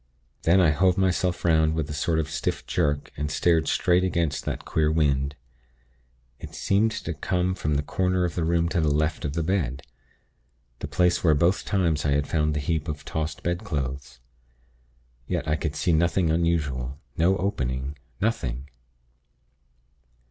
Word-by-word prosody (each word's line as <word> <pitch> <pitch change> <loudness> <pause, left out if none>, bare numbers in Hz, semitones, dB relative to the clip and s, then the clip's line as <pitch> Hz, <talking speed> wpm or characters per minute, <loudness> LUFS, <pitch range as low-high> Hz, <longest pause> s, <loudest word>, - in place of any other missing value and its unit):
Then 85 +4 +4
I 85 -4 +5
hove 90 +4 +2
myself 90 -2 0
'round 80 -1 +3
with 80 -2 -1
a 75 - -5
sort 80 +2 0
of 80 -1 0
stiff 80 - -3
jerk, 75 0 -1
and 75 0 -3
stared 80 +2 +2
straight 90 +1 +2
against 85 -5 -1
that - - -4
queer 75 -1 +1
wind. 70 -3 +1 1.0
It - - -9
seemed 105 +3 +2
to - - -4
come 90 0 -1
from 75 -5 -1
the 70 - 0
corner 90 +3 0
of 85 - -3
the 85 - -1
room 85 +1 +2
to 85 - 0
the 80 - +2
left 75 +2 0
of 70 - -2
the 85 +1 -1
bed 80 -7 -1 1.0
the - - -4
place 90 -1 +2
where 80 -3 +5
both 85 +7 +2
times 85 -7 +1
I 70 - +2
had 70 0 +1
found 75 -1 0
the - - 0
heap 80 +2 -1
of 75 -2 -5
tossed 80 -1 -4
bedclothes. 70 -7 -3 1.1
Yet, - - -2
I 75 - +2
could 80 -2 -3
see 85 +3 +1
nothing 85 +1 +2
unusual; 75 -6 -1 0.2
no 90 +4 +3
opening 65 -7 -2 0.2
nothing!... 70 - -2
80 Hz, 165 wpm, -25 LUFS, 75-90 Hz, 1.1 s, I